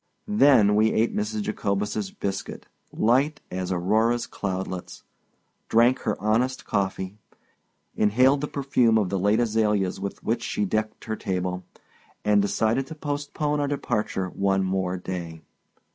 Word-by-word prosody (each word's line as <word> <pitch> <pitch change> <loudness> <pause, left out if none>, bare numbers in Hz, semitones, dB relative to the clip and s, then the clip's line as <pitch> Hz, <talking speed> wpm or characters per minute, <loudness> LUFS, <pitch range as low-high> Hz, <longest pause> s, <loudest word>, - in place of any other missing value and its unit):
Then 135 - +5
we 110 +1 +4
ate 115 +2 +1
Mrs. 105 0 -2
Jacobus's 105 - -2
biscuit, 100 - -5 0.3
light 135 +6 +2
as 90 0 -3
Aurora's 110 +7 +1
cloudlets, 95 -2 -5 0.7
drank 120 +3 +4
her 105 - -2
honest 115 +6 0
coffee, 95 0 -2 0.8
inhaled 130 +7 +3
the 150 - -2
perfume 130 -6 +2
of 105 -4 +1
the 95 - -1
late 105 +4 +2
azaleas 105 -5 +1
with 100 0 -6
which 115 +1 0
she 105 - -1
decked 110 +2 -2
her 110 - -2
table, 90 -3 -3 0.6
and 105 -1 +4
decided 110 +6 0
to 160 - -8
postpone 145 0 -2
our 145 - 0
departure 110 -9 -1
one 95 +1 0
more 95 -1 -1
day. 85 -3 -6
105 Hz, 135 wpm, -25 LUFS, 95-125 Hz, 0.8 s, Then